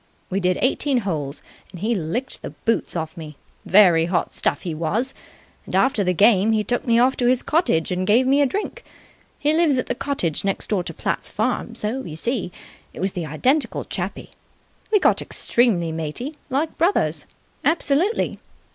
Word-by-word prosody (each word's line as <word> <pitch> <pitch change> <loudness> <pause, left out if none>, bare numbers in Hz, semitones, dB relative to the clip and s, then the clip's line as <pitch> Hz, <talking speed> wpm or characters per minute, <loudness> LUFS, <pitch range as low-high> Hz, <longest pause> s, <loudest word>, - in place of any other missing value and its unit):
We 195 - 0
did 180 -1 +1
eighteen 265 0 +2
holes, 155 -8 -4 0.3
and 180 - -10
he 220 +6 0
licked 220 +8 -3
the - - -6 0.2
boots 230 - 0
off 160 -1 -3
me. 155 -4 -9 0.3
Very 175 -5 +6
hot 175 0 -1
stuff - - 0
he 170 - -3
was. 205 +12 -1 0.5
And - - -4
after 255 -6 +3
the 180 - +1
game 205 +3 +4
he 215 -1 +1
took 245 +5 -2
me 230 -1 +4
off 255 +3 +4
to 245 - +1
his 250 0 +2
cottage 300 - +1
and 185 +1 -1
gave 235 +5 +4
me 275 +2 +4
a 285 - +4
drink. 405 +10 -4 0.5
He 295 +1 +1
lives 315 -4 +3
at 250 - 0
the - - -1
cottage 240 - -2
next 195 +2 -2
door 195 -4 +1
to - - -5
Platt's - - -3
farm, - - -2
so, 235 +6 -2
you 155 - -7
see, 225 +2 -2 0.4
it - - -8
was 190 +1 0
the 175 -4 -4
identical 255 - 0
chappie. - - -5 0.6
We 425 - +6
got - - +3
extremely 200 -9 +1
matey. 165 - -4
Like 290 +5 -2
brothers. 345 +5 +1 0.4
Absolutely! 330 +6 +1
215 Hz, 180 wpm, -22 LUFS, 175-265 Hz, 0.6 s, Very